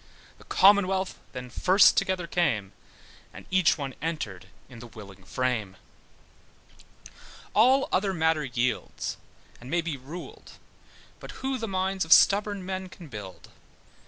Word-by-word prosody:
The - - -17
Commonwealth 195 -1 +3
then 125 -1 -8
first 185 +9 +5
together 185 -2 0
came, 145 - -1 0.6
And - - -12
each 185 -3 +3
one 140 -3 -5
entered 150 - -4 0.2
in 125 -3 -13
the 120 - -10
willing 100 -4 -13
frame; 110 -3 -2 1.8
All 260 +5 +4
other 195 +1 +1
matter 160 -3 +1
yields, 125 0 -3 0.4
and 125 - -11
may 175 +2 +1
be 160 -4 -4
ruled; 150 +7 -10 0.7
But - - -11
who 265 -1 -1
the 225 - -3
minds 190 0 -1
of 160 - +6
stubborn 200 -1 +4
men 190 0 -5
can 175 -4 -13
build? 100 -7 -10
165 Hz, 130 wpm, -27 LUFS, 125-190 Hz, 1.8 s, of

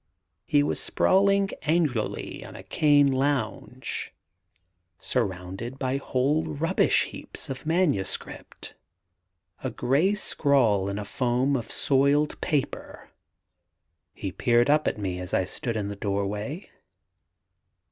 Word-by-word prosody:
He 145 -1 +4
was - - -1
sprawling 195 +1 +3
angularly 155 -8 -1
on - - -11
a - - -9
cane 145 -2 +4
lounge, 130 -2 -2 0.8
surrounded 100 +2 -3
by 130 0 -1
whole 140 +3 +1
rubbish 160 +1 +2
heaps - - -8
of 130 +3 -7
manuscript, 160 - -2 0.9
a - - -1
grey 155 +11 +2
scrawl 125 - +2
in 100 - -3
a 105 - -4
foam 125 +5 +1
of 120 -4 -3
soiled 140 +2 +2
paper. 145 -4 -3 1.0
He 95 - -4
peered 120 +6 +3
up 150 +1 +3
at - - 0
me 95 -3 -3
as 90 -1 -3
I - - +3
stood 115 +5 -4
in 105 -2 -2
the 100 - -5
doorway. 105 - -3
130 Hz, 115 wpm, -26 LUFS, 105-150 Hz, 1.0 s, He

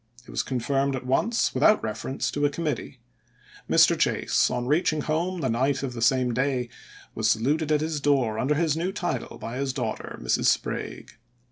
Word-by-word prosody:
It - - -12
was - - 0
confirmed 135 +2 -1
at 130 - -6
once 220 - +1
without 215 - +4
reference 110 +5 -3
to 145 - -2
a 145 - +4
committee. 150 -4 -4 0.7
Mr. - - +5
Chase, - - +1
on 120 - -2
reaching 155 +2 +1
home 170 +4 -1
the 135 - 0
night 135 +4 0
of 130 -2 -3
the 115 - -6
same 125 +1 +2
day, 125 -1 0 0.4
was - - 0
saluted 150 +7 +1
at 150 -1 +3
his 155 -2 -2
door 130 -7 +1
under 145 +5 +1
his 160 -1 +1
new 175 +4 -1
title 175 - -4
by 115 +2 -6
his 135 -1 -1
daughter, - - -4
Mrs. - - 0
Sprague. - - -1
140 Hz, 180 wpm, -26 LUFS, 125-155 Hz, 0.7 s, Mr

